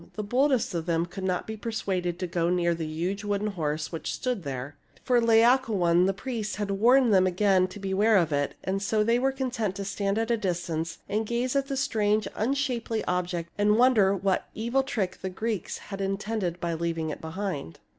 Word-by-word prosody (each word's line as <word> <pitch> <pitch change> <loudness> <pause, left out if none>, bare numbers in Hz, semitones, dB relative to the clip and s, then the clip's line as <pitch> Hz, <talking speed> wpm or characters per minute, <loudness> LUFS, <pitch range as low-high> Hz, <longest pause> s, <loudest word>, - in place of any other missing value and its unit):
The 215 - -3
boldest 255 +2 +1
of 170 -1 -3
them 165 0 +1
could 190 +2 -8
not 185 -1 -1
be 220 - -5
persuaded 195 -6 -2
to 185 - -3
go 170 -1 0
near 175 -1 +2
the 165 -1 -4
huge 175 +6 -3
wooden 205 0 -1
horse 155 -5 -3
which 165 - -4
stood 250 -5 -2
there. 140 -1 -5 0.3
For 245 -1 +3
Laocoon, 225 -7 +4
the - - +3
priest, 220 0 -4
had 205 0 -2
warned 235 +4 +4
them 185 -1 +5
again 185 0 +3
to 195 +2 -10
beware 200 +3 +3
of 165 -4 +2
it; 145 0 0
and 195 +1 -1
so 210 +1 +1
they 230 +2 +2
were 270 +2 +2
con 265 -1 -3
tent 215 -6 -2
to 200 0 -4
stand 200 0 -1
at 225 +1 0
a 235 - +3
distance 170 -4 -2
and 215 +2 -1
gaze 245 +3 -1
at 275 0 +1
the 275 -1 -3
strange, 215 -4 +1
unshapely 240 -2 -1
object 175 -2 -2
and 210 +1 +4
wonder 225 -6 +5
what 195 0 -1
evil 235 +5 +1
trick 210 -9 -3
the 190 - -3
Greeks 215 0 -3 0.2
had 195 - -4
intended 195 -2 -2
by 170 -1 -2
leaving 165 -1 -2
it - - -7
behind. 160 - -4
200 Hz, 205 wpm, -27 LUFS, 175-225 Hz, 0.3 s, them